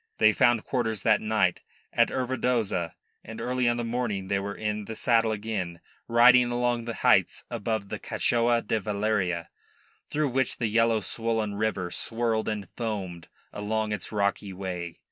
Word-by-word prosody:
They 110 0 +5
found 120 -3 +3
quarters 110 -6 -1
that 110 -2 +4
night 110 0 +1 0.3
at - - +4
Ervedoza, 120 -9 -1 0.3
and 115 0 -8
early 125 -1 +1
on 120 - 0
the 120 - -2
morrow 115 -4 -2
they 100 +1 0
were 100 +1 -4
in 105 -1 -3
the 110 - -6
saddle 115 -1 +2
again, 100 -5 -3 0.3
riding 120 +1 +6
along 120 -1 0
the 115 -1 -4
heights - - +3
above 110 -3 -2
the - - -4
Cachao 120 0 +1
da 110 +1 0
Valleria, 100 -4 -1 0.6
through 150 -1 0
which 130 +1 0
the 120 - -1
yellow, 115 0 +3
swollen 115 0 -1
river 100 -4 -1
swirled 115 -1 -1
and 105 -2 -3
foamed 95 -7 -4 0.3
along 110 +1 -2
its 105 -4 -4
rocky 100 -1 0
way. 90 -3 -5
110 Hz, 160 wpm, -27 LUFS, 100-120 Hz, 0.6 s, riding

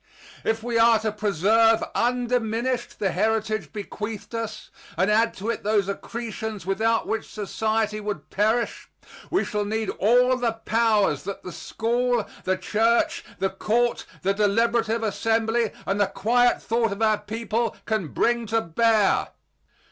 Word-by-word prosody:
If 225 0 -1
we 235 -1 0
are 230 0 +6
to 215 -1 -1
preserve 215 +3 +3
undiminished 245 0 0
the 195 -3 0
heritage 215 +2 0
bequeathed 210 +1 -6
us, 225 -1 -5 0.3
and 195 +3 +2
add 225 +2 +3
to 215 +4 -2
it - - -5
those 205 -2 +2
accretions 220 -1 -5
without 220 +4 +1
which 220 -1 -3
society 215 +1 -1
would 210 -1 -5
perish, 220 +4 0 0.4
we 375 - +1
shall 210 -1 -1
need 220 0 -2
all 250 +5 +4
the 240 -2 0
powers 225 -7 +1
that 200 0 -6
the 180 - -7
school, 240 +3 -1 0.2
the 185 0 +1
church, 225 +5 +1
the 195 - 0
court, 235 +5 0 0.2
the 195 +1 +2
deliberative 225 +2 +1
assembly, 225 +2 +1 0.2
and 195 +1 0
the 200 - +4
quiet 245 +5 +2
thought 230 -1 +1
of 200 +3 -2
our 215 -1 +3
people 225 +1 -2
can 215 -6 -1
bring 235 +8 0
to 225 +2 +2
bear. 215 +2 +2
220 Hz, 145 wpm, -24 LUFS, 205-230 Hz, 0.4 s, are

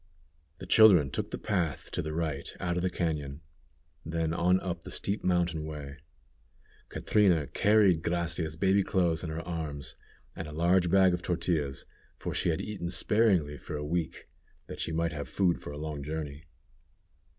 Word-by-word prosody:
The 95 - -9
children 90 -8 +6
took - - -3
the - - -4
path 90 -9 -2
to - - -2
the 75 - -4
right 75 -3 -2
out 85 -1 -1
of 90 - 0
the 95 - +1
cañon, 75 -5 -3 0.6
then 80 0 -1
on 90 +2 +3
up 85 -2 -4
the - - -9
steep 100 +2 -1
mountain 85 -3 +1
way. 75 -2 -7 0.9
Catrina 90 -8 +2
carried 100 +3 +3
Gracia's 85 -2 -2
baby 95 +4 +3
clothes 90 -4 +1
in 85 - -3
her 80 +2 -5
arms, 75 -4 -4 0.4
and 80 - -6
a - - -8
large 85 +3 +3
bag 95 0 +5
of 90 - -2
tortillas, 80 -6 -1 0.3
for - - -4
she - - 0
had 80 - 0
eaten 95 -5 -4
sparingly 90 -5 +2
for 75 - -6
a 75 - -4
week, 85 +1 -3 0.4
that - - -9
she - - -2
might 80 0 0
have 75 -1 -5
food 90 -3 +1
for - - -7
a 75 - -7
long 75 -1 -5
journey. 75 0 -5
85 Hz, 175 wpm, -29 LUFS, 75-90 Hz, 0.9 s, children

